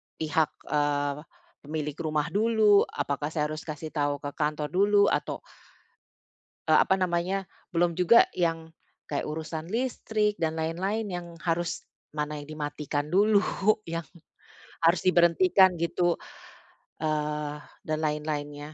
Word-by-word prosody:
pihak, 160 0 +1 0.2
eee, 145 -1 +1 0.5
pemilik 150 -1 -3
rumah 155 -1 -1
dulu? 215 0 +4
Apakah 145 +1 -2
saya 150 -1 -1
harus 155 +2 -7
kasih 155 0 -6
tahu 145 -2 -1
ke 145 - -3
kantor 150 0 -2
dulu? 200 +2 +4
Atau, - - -2 1.3
eee, - - +7
apa 190 - +4
namanya 185 +1 0 0.3
belum 170 0 +1
juga 180 - +7
yang 165 -2 -1 0.4
kayak 145 - -1
urusan 160 +1 -5
listrik 220 -2 -1
dan 160 -1 0
lain-lain 180 +7 -1
yang 175 -1 -5 0.2
harus 170 0 -1 0.3
mana 150 0 -2
yang 145 - -10
dimatikan 150 -1 -4
dulu, 205 +2 +4 0.4
yang 165 -2 -5 0.7
harus 165 +2 +3
diberhentikan 185 +1 +5
gitu, 170 +1 +1 0.8
eee, 150 -1 -2 0.2
dan 155 0 -1
lain-lainnya. 150 -1 -3
160 Hz, 120 wpm, -27 LUFS, 150-180 Hz, 1.3 s, eee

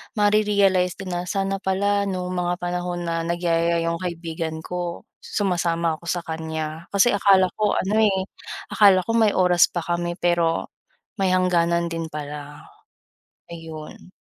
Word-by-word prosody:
mare-realize 205 -3 +3
din 190 -2 -7
na, 175 +1 -3
"Sana 195 0 -1
pala 200 +1 0
no'ng 185 -1 -3
mga 175 -1 -1
panahon 175 0 -3
na 165 0 -1
nagyayaya 170 -1 +1
'yong 170 0 -1
kaibigan 165 -2 -4
ko 175 -1 -5 0.2
sumasama 170 -4 0
ako 170 - -18
sa 175 0 -1
kaniya. 160 0 -5
Kasi 200 +5 +5
akala 195 -2 +4
ko 210 -1 +2
ano, 205 +3 0
eh, 205 -3 +3 0.5
akala 195 -3 +5
ko - - -15
may 220 -2 +4
oras 180 -1 +5
pa 175 - -1
kami 175 0 -2
pero 170 -2 0 0.5
may 190 -1 +2
hangganan 170 -2 +2
din 165 -1 -3
pala." 145 -1 -8 0.9
Ayun. 160 +1 -10
175 Hz, 145 wpm, -23 LUFS, 165-190 Hz, 0.9 s, Kasi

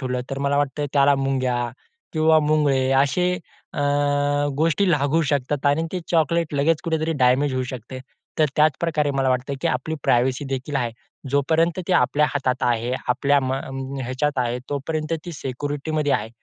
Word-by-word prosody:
ठेवलं 125 -2 -2
तर 135 - -3
मला 140 0 0
वाटतं 145 0 0
त्याला 140 0 +5
मुंग्या 130 -3 0 0.4
किंवा 160 0 +4
मुंगळे 145 -3 +2
असे 180 +6 +1 0.4
अ, - - -3 0.8
गोष्टी 165 +5 +2
लागू 150 0 +2
शकतात 145 0 -1
आणि 145 +3 +3
ते 185 - -2
चॉकलेट 165 -1 +1
लगेच 150 +3 +2
कुठेतरी 160 0 0
डॅमेज 130 +2 +3
होऊ 130 - 0
शकते. 130 0 -7 0.4
तर 155 - +5
त्याचप्रकारे 155 0 +2
मला 135 -1 0
वाटतं, 130 +2 0
की - - -1
आपली 130 +5 -2
प्रायव्हसी 130 +3 +2
देखील 135 +2 -3
आहे. 120 -3 -1 0.4
जोपर्यंत 160 +5 +2
ते - - +2
आपल्या 150 -4 +3
हातात 130 -2 -1
आहे, 120 +1 -1 0.2
आपल्या 140 +3 +3
म 130 0 -1
अं, 135 0 -5
ह्याच्यात 130 +3 -1
आहे 125 0 0
तोपर्यंत 155 +3 -3
ती 175 - -6
सिक्युरिटीमध्ये 145 +2 -2
आहे. 110 +1 0
140 Hz, 160 wpm, -22 LUFS, 130-155 Hz, 0.8 s, त्याला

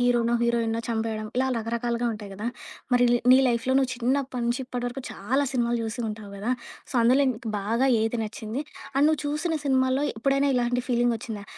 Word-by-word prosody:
హీరోనో, 240 -1 +3
హీరోయిన్‌నో 230 -1 +1
చంపేయడం, 220 -1 -2
ఇలా 265 0 +2
రకరకాలుగా 235 +1 -1
ఉంటాయి 205 -2 -8
కదా! 210 +4 -5 0.5
మరి 245 0 +5
ల్ - - +5 0.2
నీ 260 - +8
లైఫ్‌లో 245 +2 +1
నువ్వు 260 -1 0
చిన్నప్పటి 255 +1 -1
నుంచి 245 +3 0
ఇప్పటి 245 -1 -4
వరకు 260 +2 -7
చాలా 265 +8 0
సినిమాలు 240 -1 +1
చూసి 220 +2 -4
ఉంటావు 210 -1 -7
గ‌దా! 220 +6 -1 0.4
సో - - -1
అందులో 255 +4 +5
నీకు 225 0 -6
బాగా 230 +6 +1
ఏది 225 +1 0
నచ్చింది? 220 +4 -5 0.3
అండ్ 280 +2 +4
నువ్వు 310 -2 +1
చూసిన 305 +3 -1
సినిమాల్లో 260 +1 +2
ఎప్పుడైనా 275 +4 +2
ఇలాంటి 245 0 +1
ఫీలింగొచ్చిందా? 235 -3 0
240 Hz, 175 wpm, -26 LUFS, 225-260 Hz, 0.5 s, నీ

